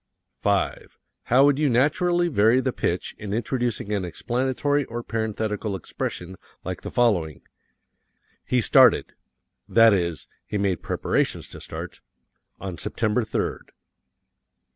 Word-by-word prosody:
5. -, -, -1 dB, 0.3 s
How 130 Hz, +3 st, +5 dB
would 145 Hz, 0 st, +3 dB
you 150 Hz, -2 st, +3 dB
naturally 175 Hz, +8 st, +2 dB
vary 115 Hz, -4 st, +4 dB
the 130 Hz, -1 st, -1 dB
pitch 90 Hz, -, -2 dB
in 105 Hz, -1 st, -4 dB
introducing 120 Hz, -3 st, -2 dB
an 100 Hz, -2 st, 0 dB
explanatory 130 Hz, -, -1 dB
or 120 Hz, +1 st, -6 dB
parenthetical 110 Hz, -2 st, -2 dB
expression 90 Hz, 0 st, -5 dB, 0.3 s
like -, -, -4 dB
the -, -, -6 dB
following: 95 Hz, -11 st, +1 dB, 1.0 s
He 125 Hz, -1 st, +1 dB
started -, -, +5 dB, 0.6 s
that 115 Hz, -1 st, +6 dB
is, 85 Hz, -4 st, -1 dB, 0.2 s
he 105 Hz, -, -2 dB
made 100 Hz, -4 st, 0 dB
preparations -, -, -1 dB
to -, -, -11 dB
start -, -, -8 dB, 0.6 s
on 95 Hz, -2 st, -6 dB
September 115 Hz, +1 st, 0 dB
third. 110 Hz, -, -3 dB
115 Hz, 120 wpm, -24 LUFS, 100-130 Hz, 1.0 s, that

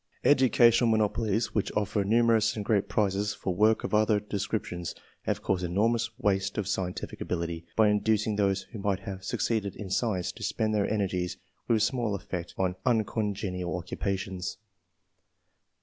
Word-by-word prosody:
Educational 120 Hz, -3 st, +5 dB
monopolies 110 Hz, 0 st, +1 dB
which 105 Hz, -, 0 dB
offer 105 Hz, 0 st, 0 dB
numerous 110 Hz, +1 st, +3 dB
and 105 Hz, -2 st, -4 dB
great 100 Hz, -2 st, +1 dB
prizes 100 Hz, 0 st, 0 dB
for 95 Hz, -, -2 dB
work 110 Hz, +4 st, +3 dB
of -, -, -4 dB
other 105 Hz, 0 st, +4 dB
descriptions, 100 Hz, -4 st, -3 dB, 0.3 s
have -, -, -1 dB
caused 95 Hz, -1 st, 0 dB
enormous 115 Hz, +6 st, +1 dB
waste 100 Hz, -5 st, 0 dB
of 105 Hz, -4 st, -1 dB
scientific 90 Hz, -1 st, -3 dB
ability, 85 Hz, -1 st, -3 dB
by 110 Hz, -1 st, +5 dB
inducing 105 Hz, 0 st, +1 dB
those 100 Hz, -1 st, +1 dB
who 115 Hz, -, -7 dB
might 100 Hz, -1 st, 0 dB
have 95 Hz, -3 st, -7 dB
succeeded 100 Hz, 0 st, -1 dB
in 95 Hz, -3 st, -7 dB
science, 95 Hz, -4 st, 0 dB
to -, -, -14 dB
spend 110 Hz, -1 st, 0 dB
their 105 Hz, -1 st, +1 dB
energies 95 Hz, -4 st, -1 dB, 0.3 s
with 110 Hz, -2 st, +3 dB
small 115 Hz, -4 st, 0 dB
effect 90 Hz, -3 st, -6 dB
on 95 Hz, -1 st, +1 dB
uncongenial 105 Hz, -6 st, -1 dB
occupations. 95 Hz, +1 st, -3 dB
105 Hz, 150 wpm, -28 LUFS, 95-110 Hz, 0.3 s, Educational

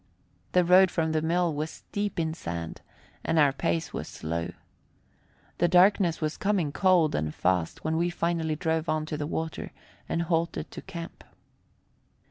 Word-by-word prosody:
The 180 Hz, -1 st, +4 dB
road 185 Hz, +2 st, +7 dB
from 160 Hz, -2 st, 0 dB
the 155 Hz, 0 st, +1 dB
mill 170 Hz, +1 st, +1 dB
was 155 Hz, +2 st, -5 dB
deep 205 Hz, -3 st, -2 dB
in 160 Hz, -1 st, 0 dB
sand, 85 Hz, -, -5 dB, 0.4 s
and 165 Hz, -, 0 dB
our 145 Hz, -3 st, +5 dB
pace 85 Hz, -, -1 dB
was -, -, -4 dB
slow. 85 Hz, +2 st, -4 dB, 1.1 s
The 175 Hz, -, +4 dB
darkness 180 Hz, -1 st, +4 dB
was 155 Hz, -1 st, -2 dB
coming 195 Hz, -7 st, +1 dB
cold 180 Hz, -3 st, +3 dB
and 75 Hz, 0 st, -1 dB
fast 90 Hz, -2 st, 0 dB
when 160 Hz, 0 st, 0 dB
we 170 Hz, +1 st, +1 dB
finally 170 Hz, -2 st, -1 dB
drove 160 Hz, 0 st, -1 dB
on 155 Hz, 0 st, 0 dB
to 155 Hz, -, -4 dB
the 145 Hz, -1 st, -3 dB
water 160 Hz, 0 st, -4 dB, 0.4 s
and 170 Hz, -, 0 dB
halted 170 Hz, 0 st, -1 dB
to -, -, -7 dB
camp. 170 Hz, 0 st, -8 dB
160 Hz, 160 wpm, -28 LUFS, 150-175 Hz, 1.1 s, road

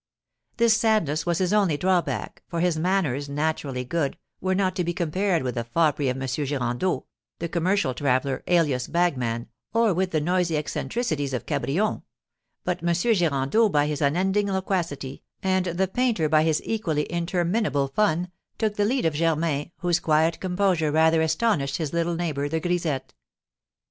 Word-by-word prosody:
This 235 Hz, -2 st, +5 dB
sadness 215 Hz, -10 st, +1 dB
was 170 Hz, -1 st, +1 dB
his 185 Hz, +1 st, +1 dB
only 195 Hz, -8 st, +3 dB
drawback, 180 Hz, +1 st, -1 dB
for 170 Hz, -, -3 dB
his 175 Hz, -1 st, +2 dB
manners, 155 Hz, -5 st, 0 dB
naturally 140 Hz, -3 st, -2 dB
good, 145 Hz, +1 st, -1 dB, 0.2 s
were 185 Hz, +1 st, 0 dB
not 185 Hz, -1 st, +1 dB
to 180 Hz, -, +1 dB
be 175 Hz, 0 st, -2 dB
compared 180 Hz, 0 st, 0 dB
with 125 Hz, -1 st, -2 dB
the 120 Hz, -, -2 dB
foppery 145 Hz, +2 st, +1 dB
of 130 Hz, +1 st, -2 dB
M. 135 Hz, -, -3 dB
Girandeau, 135 Hz, +3 st, -1 dB, 0.3 s
the 170 Hz, -, -3 dB
commercial 170 Hz, -3 st, +1 dB
traveller, 130 Hz, 0 st, 0 dB
alias 150 Hz, -8 st, +2 dB
bagman, 125 Hz, -10 st, 0 dB, 0.3 s
or 230 Hz, -3 st, +4 dB
with 185 Hz, +2 st, 0 dB
the 160 Hz, -, 0 dB
noisy 175 Hz, 0 st, +1 dB
eccentricities 150 Hz, -, -2 dB
of 125 Hz, -, -4 dB
Cabrion; 195 Hz, +10 st, -1 dB, 0.6 s
but 180 Hz, 0 st, -2 dB
M. 170 Hz, 0 st, +1 dB
Girandeau 175 Hz, -, +2 dB
by 145 Hz, -5 st, +2 dB
his 150 Hz, -1 st, -2 dB
unending 190 Hz, +8 st, +2 dB
loquacity, 175 Hz, -8 st, -2 dB, 0.2 s
and 190 Hz, -1 st, +1 dB
the 180 Hz, +3 st, 0 dB
painter 225 Hz, -6 st, +1 dB
by 155 Hz, 0 st, +4 dB
his 155 Hz, -1 st, +1 dB
equally 165 Hz, -10 st, -1 dB
interminable 175 Hz, -2 st, 0 dB
fun, 180 Hz, +2 st, 0 dB, 0.3 s
took 215 Hz, -2 st, -1 dB
the 205 Hz, -, +2 dB
lead 255 Hz, +1 st, 0 dB
of 160 Hz, -, +2 dB
Germain, 155 Hz, -1 st, 0 dB
whose 175 Hz, -1 st, +2 dB
quiet 160 Hz, +1 st, +2 dB
composure 180 Hz, -4 st, +1 dB
rather 160 Hz, +1 st, +4 dB
astonished 160 Hz, -4 st, +1 dB
his 155 Hz, -3 st, -3 dB
little 170 Hz, 0 st, 0 dB
neighbour, 150 Hz, -4 st, -2 dB
the 160 Hz, +2 st, 0 dB
grisette. 160 Hz, -6 st, -2 dB
165 Hz, 160 wpm, -25 LUFS, 145-185 Hz, 0.6 s, This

